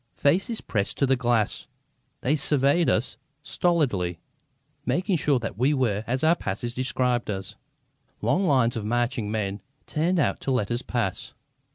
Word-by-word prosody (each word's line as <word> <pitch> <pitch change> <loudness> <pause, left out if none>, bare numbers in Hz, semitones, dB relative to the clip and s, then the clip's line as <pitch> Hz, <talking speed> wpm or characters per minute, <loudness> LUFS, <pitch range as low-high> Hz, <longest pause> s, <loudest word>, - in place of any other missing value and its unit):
Faces 195 - +1
pressed 100 -2 -2
to 140 - +3
the 135 0 +3
glass, 120 -4 0 0.5
they 140 +4 +2
surveyed 145 +3 +2
us 115 - 0 0.3
stolidly, 125 - 0 0.7
making 185 +5 0
sure 145 -2 +2
that 115 -2 -5
we 140 +4 +3
were 110 -6 0
as 130 +4 -1
our 160 +2 +5
passes 120 - -4
described 125 -2 0
us. 95 -2 -4 0.7
Long 190 0 +1
lines 130 -5 +3
of 110 - -3
marching 120 -1 -1
men 100 -2 -2 0.2
turned 170 +4 0
out 155 - +1
to - - -4
let 125 -6 0
us 120 +1 0
pass. 120 -8 -3
125 Hz, 155 wpm, -26 LUFS, 110-145 Hz, 0.7 s, our